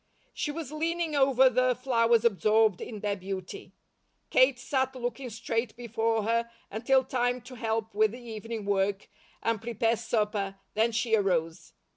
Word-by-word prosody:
She - - -2
was 300 -2 -5
leaning 325 0 -1
over 265 -2 +5
the 255 0 +2
flowers 235 -2 +2
absorbed 215 -1 +3
in 215 -3 -7
their 205 -1 0
beauty. 190 -1 -7 0.6
Kate 255 0 +5
sat 260 0 -1
looking 250 +1 -4
straight 230 0 -3
before 225 -2 -1
her 230 +2 0 0.2
until 260 +5 +2
time 245 -1 0
to 245 +2 -12
help 225 -2 -2
with 215 +1 +2
the 245 - -8
evening 225 -2 -6
work, 200 0 0 0.3
and 230 -2 0
prepare 230 0 0
supper, 210 -3 -1 0.2
then 225 +2 +2
she 225 0 +1
arose. 170 -6 -1
230 Hz, 150 wpm, -28 LUFS, 215-250 Hz, 0.6 s, over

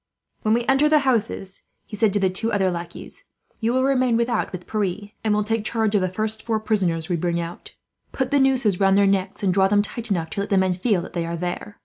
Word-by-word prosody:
"When 215 +1 +2
we 240 0 -1
enter 270 +3 +3
the 310 - +5
houses," 215 -6 0 0.2
he 210 - -8
said 210 0 +2
to 205 - +1
the 190 -1 +1
two 225 +5 -1
other 190 -3 +1
lackeys, 170 0 -8 0.3
"you 230 +1 0
will 260 +1 +2
remain 255 -3 +2
without 235 0 0
with 180 -1 -7
Pierre, 205 -1 -3
and 220 - +1
will 210 0 +2
take 225 +1 -1
charge 220 -1 0
of 205 - +3
the 185 - 0
first 215 +3 -2
four 225 -2 -1
prisoners 180 -7 0
we 175 - 0
bring 170 +1 -1
out. 170 +1 -7 0.4
Put 265 - -2
the 285 - +4
nooses 260 -8 +2
round 195 0 +4
their 200 - +5
necks, 195 0 0
and 190 -2 +2
draw 190 0 +4
them 205 +1 +3
tight 235 +2 -6
enough 170 -5 -1
to - - -4
let 200 - -2
the 195 - +2
men 190 -1 +2
feel 185 -1 0
that - - -10
they 170 -1 -2
are 170 0 -3
there. 180 +4 -5
205 Hz, 255 wpm, -23 LUFS, 185-225 Hz, 0.4 s, the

